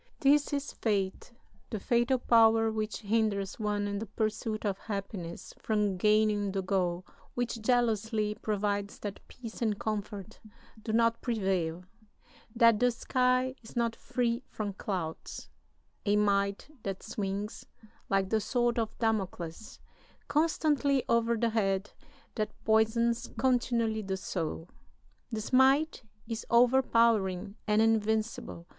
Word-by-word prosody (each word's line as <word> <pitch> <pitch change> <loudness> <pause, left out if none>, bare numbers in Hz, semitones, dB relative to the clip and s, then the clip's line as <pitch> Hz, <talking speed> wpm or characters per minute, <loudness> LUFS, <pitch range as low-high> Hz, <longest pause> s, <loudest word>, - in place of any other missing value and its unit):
] - - -39
This 290 +2 +4
is 285 0 -2
Fate, 200 -1 -1 0.4
the 215 - -3
fatal 240 +4 +2
power 225 -2 +4
which 215 0 -3
hinders 205 -2 0
one 205 -1 -1
in 200 0 -2
the 225 - -5
pursuit 215 +1 -2
of 195 -2 -1
happiness 195 -5 -6
from 210 -3 0
gaining 210 0 +2
the 195 -1 -1
goal, 185 -2 0 0.3
which 240 -2 -2
jealously 220 -2 +1
provides 205 -1 -2
that 205 -2 -5
peace 230 -2 -10
and 215 -3 +1
comfort 210 0 -4 0.4
do 220 - -4
not 230 +1 +2
prevail, 190 -7 -1 0.7
that 230 -2 +5
the 245 - +4
sky 255 +1 +1
is 225 - -14
not 235 -1 0
free 235 0 -1
from 205 -2 -4
clouds 180 -5 -5 0.6
a 205 - +4
might 200 -1 +1
that 195 -2 -5
swings, 205 -1 -4 0.4
like 195 0 +1
the 220 -1 +2
sword 240 +1 +1
of 220 -1 -3
Damocles, 195 -4 -3 0.5
constantly 290 -2 +2
over 235 0 +2
the 230 +1 +1
head, 195 -2 0 0.4
that 215 -1 -1 0.2
poisons 230 +2 +2
continually 235 -4 +1
the 190 -2 -3
soul. 165 -3 -4 0.6
This 220 +2 -4
might 270 +5 +4 0.3
is 230 -1 -4
overpowering 230 -6 +3
and 210 +1 +4
invincible. 220 -5 0
220 Hz, 125 wpm, -30 LUFS, 200-235 Hz, 0.7 s, that